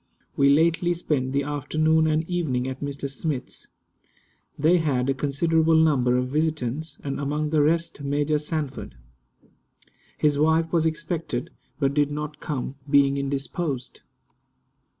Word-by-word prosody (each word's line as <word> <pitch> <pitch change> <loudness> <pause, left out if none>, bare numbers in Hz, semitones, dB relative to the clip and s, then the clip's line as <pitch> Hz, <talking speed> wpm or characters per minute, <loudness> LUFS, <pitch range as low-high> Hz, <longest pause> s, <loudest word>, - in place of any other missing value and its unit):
We 140 0 +4
lately 170 +4 +3
spent 140 -6 -1
the 140 +1 +1
afternoon 155 +2 +1
and 155 +1 0
evening 145 -9 -1
at 130 0 -6
Mr. 140 -1 -4
Smith's. 140 -1 -5 0.9
They 165 +5 +4
had 135 -5 0
a 135 - +2
considerable 160 +4 +2
number 135 -6 +3
of 125 0 -1
visitants, 155 -1 -2
and 140 -1 -3
among 150 +2 -2
the 155 -2 +3
rest 165 +1 0
Major 145 +2 0
Sanford. 150 - -4 1.2
His 145 -1 +2
wife 160 +2 +2
was 165 -1 +3
expected, 160 -5 -3 0.3
but 140 -2 +1
did 145 0 +2
not 150 0 -5
come, 135 -2 -4
being 140 -1 +4
indisposed. 140 0 -3
150 Hz, 130 wpm, -25 LUFS, 140-160 Hz, 1.2 s, We